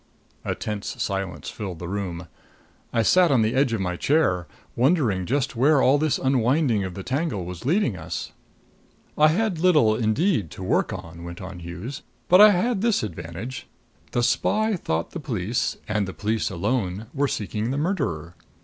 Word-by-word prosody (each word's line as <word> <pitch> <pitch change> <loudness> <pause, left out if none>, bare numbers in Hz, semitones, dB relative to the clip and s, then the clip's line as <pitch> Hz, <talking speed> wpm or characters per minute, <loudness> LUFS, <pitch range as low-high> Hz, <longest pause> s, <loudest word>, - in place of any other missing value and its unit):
A - - -2
tense 105 -2 -5
silence 95 -2 -3
filled 95 -5 -6
the 85 - -6
room. 90 -3 -4 0.6
I 115 - +2
sat 180 - +5
on 130 -6 +4
the 110 +2 +1
edge 135 -2 +2
of 115 -3 -1
my 90 -1 -1
chair, 95 - +1 0.3
wondering 120 - +2
just 135 0 0
where 140 +5 +4
all 135 +2 +4
this 155 -1 +1
unwinding 130 -3 +2
of 95 -2 -5
the 95 - -6
tangle 130 - -2
was 90 +6 -7
leading 160 - +2
us. 85 0 -5 0.8
"I 155 - +6
had 185 +2 +1
little, 155 -12 +4
indeed, 110 - +1
to 95 - -6
work 95 - +1
on," 85 +1 -8
went 85 0 -8
on 95 -1 -8
Hughes. 85 +10 -7 0.3
"But 180 +3 +8
I 215 - +10
had 205 +2 +1
this 230 - +2
advantage: 90 +6 -6 0.4
the 120 - +1
spy 215 - +2
thought 80 - -2
the 170 - -5
police, 115 - -2
and 105 -2 0
the 95 - -7
police 110 +1 -1
alone, 100 +1 -2
were 145 0 +1
seeking 110 -1 -3
the 135 - -1
murderer. 140 - -2
115 Hz, 175 wpm, -24 LUFS, 95-150 Hz, 0.8 s, I